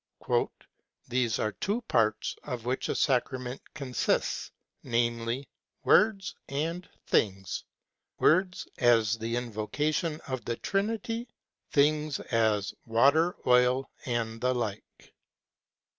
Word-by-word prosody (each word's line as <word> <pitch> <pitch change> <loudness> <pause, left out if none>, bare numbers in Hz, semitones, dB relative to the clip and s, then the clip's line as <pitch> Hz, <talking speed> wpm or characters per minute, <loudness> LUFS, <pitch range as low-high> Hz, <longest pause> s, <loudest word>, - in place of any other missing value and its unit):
"There 125 -1 +1
are 110 - 0
two 205 - -2
parts 110 - +1
of 125 -4 -5
which 125 +2 -1
a - - 0
sacrament 130 -1 0
consists, 135 -5 -1 0.3
namely 120 +2 -1 0.4
words 205 -3 +4 0.2
and 165 +6 -2 0.2
things: 95 -4 0 0.5
words, 180 +2 +3
as 115 -3 +4
the 115 +1 -2
invoca 120 +6 -1
tion 160 -1 -1
of 130 -2 -5
the 120 - -1
Trinity; 225 - -2 0.4
things, 150 0 +2
as 110 -4 +1
water, 140 +10 +4
oil, 125 +1 +4 0.2
and 115 -2 -2
the 125 0 +2
like." 110 -4 -5
125 Hz, 105 wpm, -29 LUFS, 115-155 Hz, 0.5 s, words